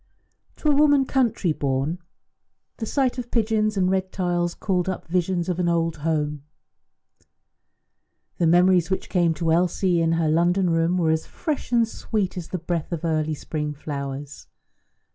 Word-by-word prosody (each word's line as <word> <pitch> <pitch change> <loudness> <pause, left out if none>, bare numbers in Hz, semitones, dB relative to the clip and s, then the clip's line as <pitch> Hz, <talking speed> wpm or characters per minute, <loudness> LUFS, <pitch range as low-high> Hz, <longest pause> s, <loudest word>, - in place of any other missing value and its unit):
To - - -4
a 290 - +4
woman 290 -2 +4
country 235 - +1
born 140 +4 -1 0.8
the 225 - -4
sight 265 -1 0
of 245 -1 -6
pigeons 215 -2 +1
and 185 -1 +2
red 190 0 0
tiles 175 -2 -1
called 185 -2 -1
up 185 - -4
visions 175 0 0
of 180 -1 -2
an 175 -1 +1
old 165 -1 0
home. 150 -1 -1 2.0
The 170 - +3
memories 175 +1 +4
which 190 - -2
came 170 -3 +2
to 165 +1 0
Elsie 175 +1 +2
in 165 0 +2
her 165 -1 +1
London 175 +3 +2
room 165 +2 +2
were 165 -3 +2
as 160 0 -1
fresh 305 -6 -4
and 235 -2 +3
sweet 210 -4 -3
as 175 -3 -5
the 185 - -3
breath 170 0 -3
of 170 -1 -3
early 155 -1 0
spring 150 0 -4
flowers. 140 -1 -6
175 Hz, 160 wpm, -24 LUFS, 160-190 Hz, 2.0 s, a